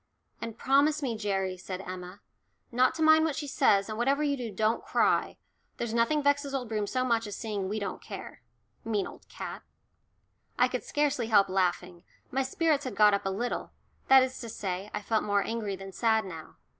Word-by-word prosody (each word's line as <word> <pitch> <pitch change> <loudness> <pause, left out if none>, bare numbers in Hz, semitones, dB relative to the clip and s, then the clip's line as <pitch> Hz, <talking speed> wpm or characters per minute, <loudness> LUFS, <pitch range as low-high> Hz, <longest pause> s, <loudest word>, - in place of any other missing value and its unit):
And 230 -1 -6
"Promise 285 +4 +3
me, 240 -4 -1
Gerry," 195 -3 -1
said 185 0 -6
Emma, 185 +1 -8 0.5
"not 250 +1 +3
to 320 - 0
mind 315 0 +6
what 315 -3 0
she 295 - -4
says, 200 -7 +3
and 215 0 -5
whatever 275 +5 +2
you 285 -1 +1
do, 245 -4 -5
don't 215 +3 0
cry. - - +1 0.4
There's 235 -2 -3
nothing 260 +6 +2
vexes 285 -1 +1
old 250 -4 -3
Broom 210 -2 -1
so 255 +4 0
much 230 -3 +1
as 205 - -5
seeing 205 -4 -3
we 210 - -2
don't 200 -2 -4
care - - -9 0.4
mean 210 -3 0
old - - -12
cat." - - -7 1.0
I - - +5
could - - -3
scarcely 285 -6 0
help 200 -4 +4
laughing, 180 -2 -1 0.3
my 270 - +1
spirits 290 +2 +1
had 250 -5 -4
got 210 0 +6
up 200 -1 0
a - - +1
little 230 +6 -3 0.3
that 265 -1 +8
is 260 0 -4
to 230 - -6
say, 195 -1 -4
I 210 - -4
felt 220 +1 +1
more 205 -1 +1
angry 220 -4 -3
than 195 0 -9
sad 220 +1 +2
now. 165 -4 -9
225 Hz, 200 wpm, -29 LUFS, 200-265 Hz, 1.0 s, that